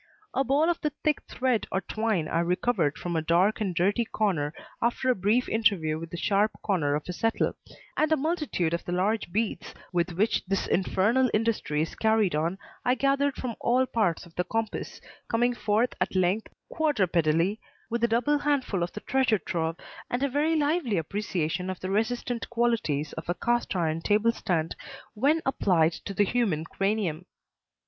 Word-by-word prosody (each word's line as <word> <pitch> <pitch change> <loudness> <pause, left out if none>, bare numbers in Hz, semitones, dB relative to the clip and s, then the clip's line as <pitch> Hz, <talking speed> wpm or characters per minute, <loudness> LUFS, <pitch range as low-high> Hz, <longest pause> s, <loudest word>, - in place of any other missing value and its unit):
A 270 - +2
ball 280 +5 +2
of 345 -1 0
the 300 - +1
thick 305 -1 +2
thread 250 -3 0
or 190 - +1
twine 215 -8 -1
I 165 - 0
recovered 175 -2 +1
from 175 -1 -4
a 160 - +1
dark 175 +7 +2
and 190 -4 -1
dirty 200 +7 +2
corner 185 -10 0 0.3
after 240 +2 +2
a - - +1
brief 210 +7 +2
interview 185 -9 +1
with 165 0 -7
the 175 - -6
sharp 205 +4 +2
corner 155 -8 +1
of 150 - -4
a 180 - -3
settle, 225 +5 0 0.4
and 310 +1 +1
a 315 - +4
multitude 300 - -1
of 170 - -1
the 175 - -4
large 195 +2 0
beads 220 +3 -2 0.2
with 175 0 0
which 205 +6 +1
this 195 0 0
infernal 215 +7 +2
industry 215 -9 0
is 160 - -5
carried 220 -5 +2
on 165 +5 0 0.3
I 250 - +3
gathered 275 +2 +1
from 245 -3 -4
all 250 +2 +3
parts 210 -10 0
of 170 - -17
the 180 - 0
compass, 225 +3 -3 0.3
coming 240 +2 +2
forth 220 +1 +1
at - - 0
length 185 +4 +1 0.2
(quadrupedally) 185 - +1 0.3
with 235 0 -1
a - - +6
double 245 +6 +2
handful 280 -10 0
of 175 - -2
the 210 - -6
treasure 260 -4 +2
trove 165 -3 -2 0.3
and 245 +2 -1
a 280 - +2
very 300 +5 +1
lively 295 - +1
appreciation 180 0 -2
of 185 - -4
the 185 - -4
resistant 235 +3 -1
qualities 230 -12 0
of - - -7
a 175 - +1
cast 240 -1 0
iron 165 -2 0
table 215 +5 +3
stand 165 -7 -1 0.4
when 285 +9 +2
applied 175 -11 +3
to 195 - -7
the 205 - +4
human 200 -9 0
cranium. 195 -3 -1
210 Hz, 180 wpm, -27 LUFS, 175-245 Hz, 0.4 s, a